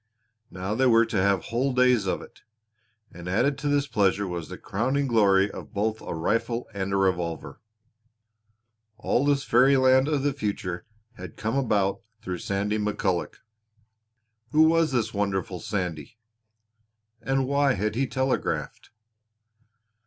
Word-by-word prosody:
Now 95 +2 -4
they 130 +4 +2
were 115 -1 +5
to 110 -4 -1
have 100 -2 +2
whole 125 +3 -1
days 125 -5 +3
of - - -2
it. - - -16 0.7
And 85 +1 -8
added 125 +9 +1
to 145 - -3
this 145 -1 +2
pleasure 100 -5 +1
was 85 -3 -5
the - - -7
crowning 130 +7 -1
glory 100 -5 +3
of - - -10
both 110 +2 -1
a - - -5
rifle 115 +8 -1
and 100 -1 -3
a 100 - +1
revolver! 90 -4 -1 1.4
All 120 +3 0
this 140 -1 +2
fairy 130 +4 +4
land 130 +1 +4
of 150 -3 0
the 145 -1 +1
future 100 -8 -4 0.3
had 90 -3 -10
come 110 +4 -2
about 105 -6 +1 0.2
through 90 -4 -4
Sandy 100 +3 -1
McCulloch! 100 -4 -1 1.1
Who 155 +1 +5
was 165 -1 +3
this 115 -3 -1
wonderful 95 -3 -2
Sandy? 90 0 -4 1.0
And 135 +2 0
why 140 0 +2
had 105 0 -1
he 130 +4 0
telegraphed? 130 +1 -2
110 Hz, 145 wpm, -26 LUFS, 95-130 Hz, 1.4 s, were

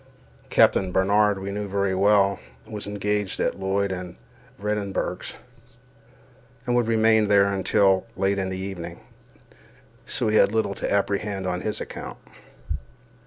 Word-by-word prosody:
Captain 95 -2 +4
Barnard, 100 +2 +3
we 95 +1 -5
knew 105 +1 -3
very 100 -1 0
well, 100 +1 +3 0.3
was 105 -2 -7
engaged 105 -1 -2
at - - -1
Lloyd 95 +1 0
and 90 -1 -6 0.4
Vredenburgh's, 105 -1 -3 1.3
and 120 - +1
would 120 -2 +2
remain 110 -1 +4
there 100 -1 +5
until 95 +1 +2
late 100 +1 +1
in 95 -1 -1
the 95 - -4
evening, 90 -3 -6 1.1
so - - 0
we 110 0 +3
had 100 - +5
little 110 -3 0
to - - -4
apprehend 100 -1 0
on 90 -1 -2
his 105 - -2
account. - - -7
100 Hz, 135 wpm, -24 LUFS, 95-105 Hz, 1.3 s, there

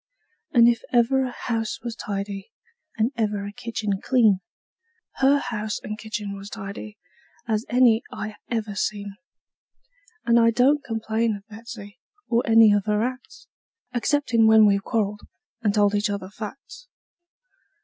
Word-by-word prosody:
And 235 -4 +6
if 235 -1 +2
ever 250 +2 +3
a - - -3
house 225 -3 -3
was 235 -2 -4
tidy, 200 -2 -5 0.5
and 225 +3 +1
ever 210 -3 -1
a 205 - -6
kitchen 210 -3 -3
clean, 225 -7 +3 0.8
Her 275 +2 +4
house 220 -6 -3
and 215 - -4
kitchen 215 -2 -5
was 195 +1 -9
tidy 210 0 -8 0.5
as 220 0 -1
any 240 -2 +4
I 215 -1 -6
ever 220 -3 -2
seen; 200 0 -3 1.1
And 235 0 +5
I 230 0 +5
don't 265 +5 +3
complain 225 -2 -1
of 200 0 -12
Betsey, 220 0 -10 0.3
or 235 0 +2
any 225 -2 +7
of 205 -1 +1
her 210 0 +1
acts, 255 +1 -6 0.5
Exceptin' 240 -2 +2
when 220 -1 +7
we've 200 -1 +3
quarreled, 210 -2 -1 0.4
and 215 -3 +2
told 205 -1 +3
each 205 0 +1
other 200 -2 -4
facts. 275 - -9
220 Hz, 145 wpm, -24 LUFS, 205-235 Hz, 1.1 s, any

